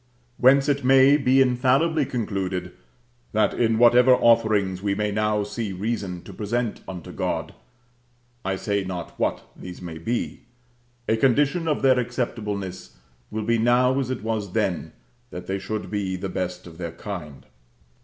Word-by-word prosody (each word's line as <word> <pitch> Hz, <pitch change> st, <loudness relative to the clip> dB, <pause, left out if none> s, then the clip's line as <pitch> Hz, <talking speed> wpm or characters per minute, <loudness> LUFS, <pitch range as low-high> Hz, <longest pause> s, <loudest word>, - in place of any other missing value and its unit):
Whence 135 Hz, +3 st, +5 dB
it 140 Hz, -1 st, +1 dB
may 135 Hz, +2 st, +6 dB
be 135 Hz, -2 st, +3 dB
infallibly 135 Hz, +4 st, +2 dB
concluded, 95 Hz, -6 st, -3 dB, 0.6 s
that 110 Hz, 0 st, +2 dB
in 115 Hz, -2 st, +1 dB
whatever 120 Hz, +2 st, +6 dB
offerings 105 Hz, -6 st, +3 dB
we 100 Hz, -1 st, 0 dB
may 105 Hz, 0 st, -1 dB
now 105 Hz, 0 st, +1 dB
see 105 Hz, -1 st, -4 dB
reason 95 Hz, -3 st, -3 dB
to 100 Hz, -, -11 dB
present 110 Hz, +4 st, -2 dB
unto 90 Hz, -4 st, -7 dB
God -, -, -3 dB, 0.9 s
(I 95 Hz, +1 st, -1 dB
say 100 Hz, +1 st, -1 dB
not 90 Hz, -2 st, -5 dB
what -, -, 0 dB
these 90 Hz, -1 st, -9 dB
may 85 Hz, -3 st, -7 dB
be), 115 Hz, +9 st, -3 dB, 0.7 s
a 110 Hz, -, +2 dB
condition 145 Hz, +7 st, +2 dB
of 150 Hz, -3 st, 0 dB
their 130 Hz, -1 st, +5 dB
acceptableness 105 Hz, -6 st, -4 dB, 0.3 s
will 110 Hz, 0 st, -3 dB
be 115 Hz, 0 st, +2 dB
now, 125 Hz, +3 st, +3 dB
as 130 Hz, -2 st, -2 dB
it 130 Hz, -5 st, -4 dB
was 110 Hz, -4 st, -3 dB
then, 100 Hz, -6 st, -1 dB, 0.4 s
that 90 Hz, -, -8 dB
they 95 Hz, +1 st, -2 dB
should 110 Hz, +2 st, -5 dB
be 100 Hz, -3 st, -2 dB
the 95 Hz, +1 st, -4 dB
best 90 Hz, 0 st, -4 dB
of 85 Hz, -1 st, -12 dB
their 85 Hz, -2 st, -5 dB
kind. 80 Hz, -8 st, -8 dB
110 Hz, 155 wpm, -24 LUFS, 95-125 Hz, 0.9 s, may